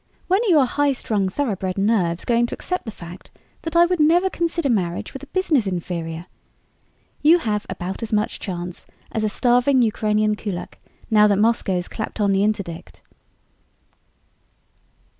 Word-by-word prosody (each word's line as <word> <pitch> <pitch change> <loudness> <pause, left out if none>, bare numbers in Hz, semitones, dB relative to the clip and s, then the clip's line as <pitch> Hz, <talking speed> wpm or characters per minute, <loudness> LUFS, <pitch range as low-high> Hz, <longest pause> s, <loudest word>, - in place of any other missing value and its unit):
"When 380 +4 +3
are 470 - 0
your 300 -6 +5
high 285 +2 +1
strung, 205 -6 -1
thoroughbred 195 -6 -2
nerves 195 -5 +1
going 235 0 +2
to - - -5
accept 365 -4 -4
the - - -4
fact 175 -2 -11 0.3
that 325 0 -5
I 340 0 +7
would 360 0 -1
never 345 +5 +4
consider 335 -2 -1
marriage 180 -8 -1
with 270 - -7
a 285 - -11
business 310 - +1
inferior? 170 -2 -4 1.0
You 315 +4 +6
have 210 -9 -2
about 190 +2 -5
as 230 0 -4
much 210 0 0
chance 175 -2 -6 0.2
as 220 - -2
a 215 - +1
starving 245 +3 +3
Ukrainian 215 -1 +1
kulak 200 -5 -6 0.3
now 210 -1 +6
that 200 -1 +2
Moscow's 200 -5 +1
clapped 220 0 -6
on 200 -1 +2
the 195 0 +2
interdict." 200 -6 -3
215 Hz, 160 wpm, -22 LUFS, 190-280 Hz, 1.0 s, I